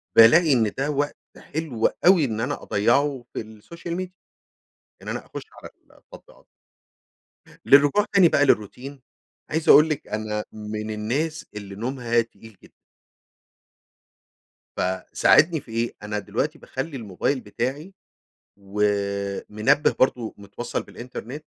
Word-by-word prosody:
بالاقي 145 +7 +7
إن 110 -4 +2
ده 140 +2 -1
وقت 145 +1 -1 0.2
حلو 145 -8 -3 0.2
أوي، 175 -5 +6
إن 110 -2 -3
أنا 125 - -3
أضيّعه 125 +4 +1
في - - -3
السوشيال 165 +11 -8
ميديا، 185 0 -5 0.9
إن - - -12
أنا - - -4
أخش - - -8 0.2
على - - -9 0.3
التطبيقات. - - -17 1.2
للرجوع 145 +9 +6
تاني 185 -4 +6
بقى 145 - +3
للروتين 130 +4 -1 0.5
عايز 160 +1 -2
أقول 155 +2 +8
لِك 150 -1 -3
أنا 105 0 -3
من 110 0 -5
الناس 140 +10 -2
اللي 100 -2 -8
نومها 120 +1 0
تقيل 115 -2 -10
جدًا. - - -18 2.0
فساعدني 95 - +3
في 115 - -17
إيه، 115 +1 -1
أنا 105 0 -3
دلوقتي 120 +10 -3
باخلّي 135 +2 -5
الموبايل 115 +4 -2
بتاعي 130 - -4 0.6
ومنبه 100 +5 0
برضه 125 -3 +1
متوصل 100 +4 -5
بالإنترنت، 125 +4 -9
120 Hz, 120 wpm, -24 LUFS, 105-145 Hz, 2.0 s, أقول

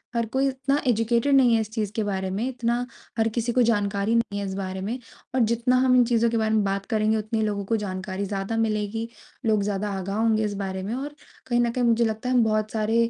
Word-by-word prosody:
हर 235 -1 +1
कोई 270 +1 +3
उतना 275 +2 0
एजुकेटेड 235 +4 +2
नहीं 250 -3 +5
है 225 - +2
इस 220 0 -6
चीज़ 215 -3 -2
के 220 - 0
बारे 190 -2 -2
में, 220 +6 -1
इतना 240 -1 -1 0.3
हर 225 - +3
किसी 235 +1 -1
को 250 +1 +3
जानकारी 205 -1 +1
नहीं 230 -3 0
है 200 - -3
इस 190 - -4
बारे 190 -1 -4
में। 230 +6 -3 0.4
और - - +2
जितना 235 +2 +2
हम 255 0 +5
इन 250 - +6
चीज़ों 235 -1 +2
के 230 - 0
बारे 220 0 +1
में 215 - +3
बात 195 0 -1
करेंगे 220 -1 +1
उतने 215 +1 -2
ही 220 - +1
लोगों 205 -1 -2
को 225 - +1
जानकारी 190 -1 -4
ज़्यादा 195 +3 -3
मिलेगी। 220 0 -1 0.4
लोग 215 -2 +2
ज़्यादा 205 0 -2
आगाह 195 +2 -3
होंगे 220 -1 +2
इस 210 - -1
बारे 190 -1 -3
में 210 +4 -3
और 290 +3 -5 0.3
कहीं 240 -1 +1
न 235 -1 +1
कहीं 245 0 -1
मुझे 235 0 +3
लगता 220 +3 -2
है 255 - +2
हम 240 - +5
बहुत 215 -1 0
सारे 225 +1 +1
220 Hz, 250 wpm, -25 LUFS, 205-235 Hz, 0.4 s, इन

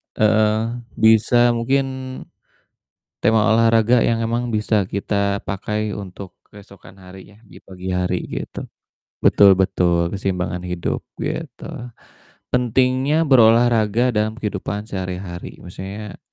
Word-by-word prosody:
Heeh, 110 +2 +2 0.2
bisa 115 +2 +4
mungkin 130 +4 +1 1.3
tema 110 0 +3
olahraga 115 +1 +4
yang 115 0 +1
emang 120 +1 -2
bisa 105 -2 +1
kita 100 0 -1
pakai 105 +2 -3
untuk 95 -1 -9
keesokan 100 -1 -15
harinya, 95 +4 -14
di 105 - -16
pagi 95 0 -8
hari 90 0 -1
gitu. - - -6 0.6
Betul 100 -1 +6
betul, 85 -2 +1
keseimbangan 90 -2 -3
hidup, 90 -1 -3 0.2
gitu. 155 -6 -5 0.9
Pentingnya 130 +5 +2
berolahraga 120 -2 +4
dalam 110 0 0
kehidupan 105 -1 -4
sehari-hari, 90 -3 -6
maksudnya 95 +3 -8
105 Hz, 105 wpm, -20 LUFS, 95-115 Hz, 1.3 s, Betul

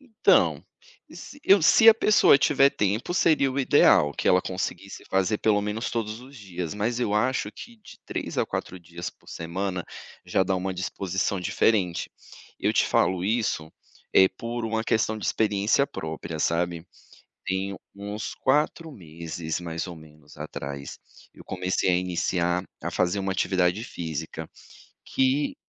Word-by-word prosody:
Então, 240 -6 +2 0.5
se 290 - -11
eu 195 -1 +6
se 225 +7 +7
a 225 - +10
pessoa 215 -10 +5
tiver 140 -1 +4
tempo, 105 - -1
seria 150 -6 +3
o 130 - -3
ideal 75 - +5
que - - -1
ela 90 - +5
conseguisse 95 +1 -5
fazer 95 +2 +1
pelo 105 -2 +2
menos 105 +3 -3
todos 110 0 -3
os 135 +2 -14
dias. 90 -5 -6
Mas 115 +4 -1
eu 105 -4 0
acho 120 -1 0
que 235 0 -11
de 215 - -15
3 - - -4
a - - +1
4 95 - -5
dias 85 +1 -7
por - - -23
semana 90 +2 -4 0.4
já - - +1
dá 95 +1 0
uma 95 0 -3
disposição 95 +1 -2
diferente. 90 -1 +1 0.5
Eu - - +1
te - - +3
falo 90 -1 +1
isso, 100 -8 -1 0.4
eh, 95 - +7
por 115 +5 -5
uma 110 0 -1
questão 110 -1 0
de 105 - -4
experiência 105 +5 +2
própria, 80 0 -6
sabe. 85 +1 -1 0.6
Tem 95 +1 -2 0.2
uns 105 +2 -6
4 150 +4 0
meses 80 - -6
mais 85 0 -4
ou 85 - -8
menos 75 -2 -17
atrás, 70 0 -7 0.4
eu - - -14
comecei 95 0 -1
a 90 - +3
iniciar 90 0 0 0.2
a - - -2
fazer 90 +2 0
uma 95 -1 -1
atividade 90 +1 +1
física 80 - -6 0.6
que 135 - +1
95 Hz, 155 wpm, -26 LUFS, 90-115 Hz, 0.6 s, a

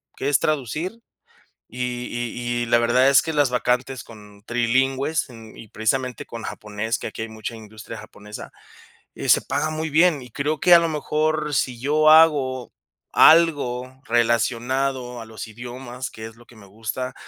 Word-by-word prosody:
que 140 - -2
es 145 - +3
traducir, 155 - -2 0.7
y 125 +2 -6 0.3
y 120 0 -3
y - - -3
la 120 0 +4
verdad 125 +3 +4
es 140 0 +6
que 160 -1 -4
las 145 -3 +3
vacantes 125 0 -1
con 105 -2 -15
trilingües 130 +5 0
en 115 -2 -13
y 110 - -11
precisamente 125 +4 -2
con 115 -1 -8
japonés, 105 +2 -4
que - - -5
aquí - - -9
hay 115 - -5
mucha 110 +1 -7
industria 110 -1 -10
japonesa, 105 +1 -11 0.6
eh, - - -5
se - - +6
paga 155 - -2
muy 155 +1 -3
bien, 155 -1 +3
y 125 - -12
creo 145 +4 -2
que 175 -1 +7
a 170 - +8
lo 165 - 0
mejor 155 0 -1
si 125 -3 -1
yo 155 +3 +3
hago 145 -6 +4 0.5
algo 130 -6 +4
relacionado 120 +2 0
a - - -8
los 110 0 -8
idiomas, 125 +3 -7
que 110 - -9
es 110 0 -10
lo 120 +1 -18
que 120 - -18
me 100 - -15
gusta, 115 +5 -5
125 Hz, 175 wpm, -22 LUFS, 115-145 Hz, 0.7 s, a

